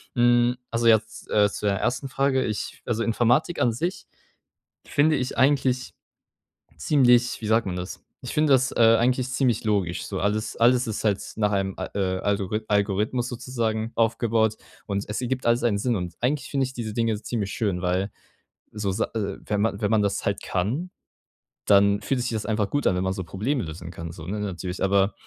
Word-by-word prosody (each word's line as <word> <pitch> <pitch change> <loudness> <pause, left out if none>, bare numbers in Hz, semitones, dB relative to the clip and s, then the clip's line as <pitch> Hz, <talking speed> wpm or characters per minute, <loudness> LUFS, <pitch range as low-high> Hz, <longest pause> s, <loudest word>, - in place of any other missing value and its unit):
Mhm. 120 0 +4
Also 115 0 +1
jetzt, 110 -1 +2
äh, 105 -1 +4
zu 105 - -6
deiner 100 -1 +1
1. 135 +2 -1
Frage, 135 0 +1
ich 105 -2 -4
also 115 -1 -1
Informatik 120 +9 +1
an 120 - +3
sich 175 - -3 0.8
finde 155 +2 +3
ich 130 -1 -3
eigentlich 130 0 +2 0.9
ziemlich, 125 -5 +3
wie 110 - -4
sagt 110 +1 +3
man 90 - -3
das 90 +1 -6 0.2
ich 125 - -6
finde 150 -1 +2
das, 130 -1 +3
äh, 115 -1 +6
eigentlich 125 +2 +1
ziemlich 125 -3 +1
logisch 100 -5 0
so. 95 - -4
Alles 105 +2 -1
alles 125 +1 +4
ist 110 0 -3
halt 100 -2 +2 0.2
nach 105 -1 +1
einem 95 -1 -1
Al - - -4
äh, 95 -2 0
Algorith 100 +2 -1
Algorithmus 105 +4 0
sozusagen 115 -2 -3
aufgebaut 115 -1 +1 0.3
und 100 0 -2
es 105 +4 -3
ergibt 130 +1 -2
alles 120 +1 +2
einen 115 -4 +2
Sinn. 120 +3 0
Und 90 -3 -4
eigentlich 140 +4 -1
finde 135 -2 +1
ich 130 - -7
diese 115 -4 -4
Dinge 115 -2 0
ziemlich 105 -6 -3
schön, 95 -5 -1
weil 90 +3 0 0.6
so 105 -2 -2
Sa 95 - 0
äh, 100 -3 -2
wenn 105 -1 -1
man 110 -1 -1
wenn 105 - +1
man 110 -1 +3
das 100 -1 -1
halt 100 0 -2
kann, 125 - -2 0.7
dann 100 0 +4
fühlt 125 +6 -1
sich 125 0 -2
das 110 -2 -3
einfach 105 -2 0
gut 145 -1 +1
an, 90 - +2
wenn 90 - -1
man 95 0 0
so 95 -1 -4
Probleme 105 - -2
lösen 80 +1 -7
kann 85 -1 -7
so, 80 -2 -10
ne, 100 +4 -3
natürlich. 95 -2 -4
Aber 100 +1 +3
110 Hz, 195 wpm, -25 LUFS, 100-125 Hz, 0.9 s, äh